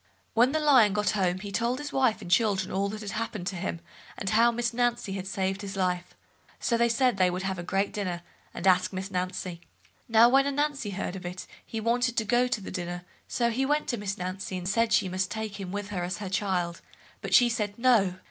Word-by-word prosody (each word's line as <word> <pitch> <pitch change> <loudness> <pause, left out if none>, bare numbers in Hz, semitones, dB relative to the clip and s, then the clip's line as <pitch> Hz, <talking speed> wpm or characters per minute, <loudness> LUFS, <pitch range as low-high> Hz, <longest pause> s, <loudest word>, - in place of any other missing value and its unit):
When 245 +3 +4
Lion 280 -9 +5
got 210 0 +1
home 185 -3 0
he 200 0 -6
told 235 +4 0
his 295 +1 -6
wife 255 -5 +2
and 175 - -7
children 195 -2 +2
all 200 +1 0
that 215 0 -6
happened 215 -4 -4
to 190 - -3
him, 175 -2 -4 0.4
and 195 - -2
how 230 +2 +5
Miss 235 0 -1
Nancy 240 -4 0
had 190 -1 -5
saved 190 0 -2
his 200 -1 -6
life, 180 -2 -1 0.4
so 235 - +1
they 235 0 +3
said 245 -1 +2
they 185 -1 +4
would 180 +1 -3
have 190 -1 -2
a - - -4
great 195 +3 -1
dinner, 180 -4 -3 0.3
and 170 - -6
ask 185 -1 +4
Miss 190 +1 -5
Nancy. 180 -1 -3 0.5
Now 230 +1 +7
when 270 +3 +4
Ananzi 280 -6 -1
heard 190 -1 -3
of 190 - -7
it, 180 +1 -6 0.2
he 225 - -5
wanted 240 +2 +1
to 225 - +2
go 240 +4 +3
to 235 -4 -2
the - - -7
dinner, 175 -1 -4 0.2
so 235 -1 0
he 255 +4 0
went 295 +2 +1
to 240 - 0
Miss 200 -1 -3
Nancy, 185 +1 -4
and 180 0 -5
said 230 +3 +2
she 205 -2 +3
must 185 +1 -1
take 220 -2 -5
him 185 -2 -5
with 205 0 -4
her 190 -4 -3
as 180 +2 -3
her 200 -2 -5
child, 180 -3 -1 0.4
but - - +1
she 245 - +7
said 210 -3 -2
"No". 230 -7 +3
205 Hz, 230 wpm, -28 LUFS, 185-235 Hz, 0.5 s, Now